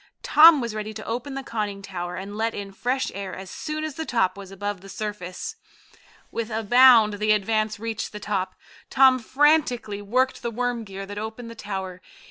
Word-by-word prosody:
Tom 310 -2 +8
was 235 -2 -3
ready 215 0 -5
to 215 - -7
open 250 +4 -4
the 270 - -4
conning 210 -5 -4
tower 180 -2 -5
and 195 +2 -7
let 225 +1 -1
in 200 -1 -6
fresh 250 +6 -1
air 195 0 -5
as 190 0 -9
soon 310 0 -4
as 310 -1 -3
the 320 - -4
top 230 -10 +1
was 200 -1 -10
above 200 0 -5
the 195 - -12
surface. 210 - -5 0.7
With 230 -1 -3
a 225 0 -2
bound 230 -2 +6
the 215 0 +3
Advance 215 +1 0
reached 225 0 -4
the 210 - -7
top. 195 -3 -2 0.3
Tom 265 -1 +5
frantically 250 -5 +2
worked 255 +6 0
the 235 - -2
worm 240 0 -2
gear 195 0 -7
that 205 +1 -6
opened 220 +2 -6
the - - -7
tower. 190 -4 -6
215 Hz, 195 wpm, -24 LUFS, 200-245 Hz, 0.7 s, Tom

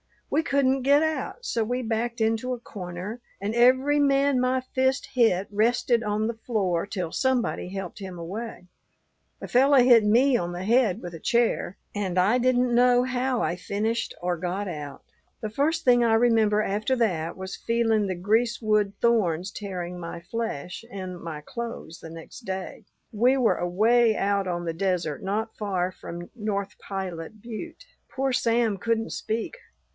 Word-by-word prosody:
We 305 - +3
couldn't 270 -2 +2
get 285 +3 +5
out, 315 +9 -3
so 230 - 0
we 250 +3 -2
backed 235 +1 -2
into 225 +3 +1
a 245 - -5
corner; 185 +1 -7 0.2
and 205 +2 -2
every 260 +5 +4
man 275 -1 +3
my 255 +1 +1
fist 260 +1 0
hit 225 -7 +3
rested 230 +2 +2
on 210 0 0
the 230 - -1
floor 195 -6 0
till 185 -5 -4
somebody 255 -5 0
helped 195 +1 -6
him 190 -3 -7
away. 185 +3 -6 0.7
A - - -5
fellow 270 +3 +5
hit 245 -3 +7
me 245 +5 +4
on 175 -4 -3
the 175 +1 -5
head 225 -1 +2
with 175 - -7
a 165 - -8
chair 235 -4 +1 0.2
and 190 -3 -2
I 200 +7 +4
didn't 250 0 +2
know 245 0 +5
how 255 -1 0
I 170 - 0
finished 215 +5 -2
or 175 0 -1
got 185 +4 -3
out. 145 -4 -7 0.4
"The 215 - -3
first 315 +7 0
thing 245 -1 +5
I 230 -1 +3
remember 225 -2 +4
after 215 +6 0
that 180 -9 0
was 190 0 -6
feeling 225 -3 +1
the 185 - -2
greasewood 215 +1 +1
thorns 195 -6 +2
tearing 180 -3 -5
my 170 0 -6
flesh 180 -4 -4
and 185 -3 -6
my 160 -3 -6
clothes 230 -3 -7
next 165 +8 -10
day. 190 +2 -5 0.3
We 245 +5 +3
were 245 -4 +3
away 220 +6 +3
out 200 -1 0
on 175 -1 -2
the 165 - -2
desert 175 -4 -1
not 215 +3 -2
far 185 -4 -1
from 175 -1 -9
North 205 -3 -3
Pilot 190 0 -6
butte. 240 - -8 0.2
Poor 270 0 -1
Sam 230 -3 +1
couldn't 225 +2 -1
speak. 225 - -3
220 Hz, 165 wpm, -26 LUFS, 185-245 Hz, 0.7 s, hit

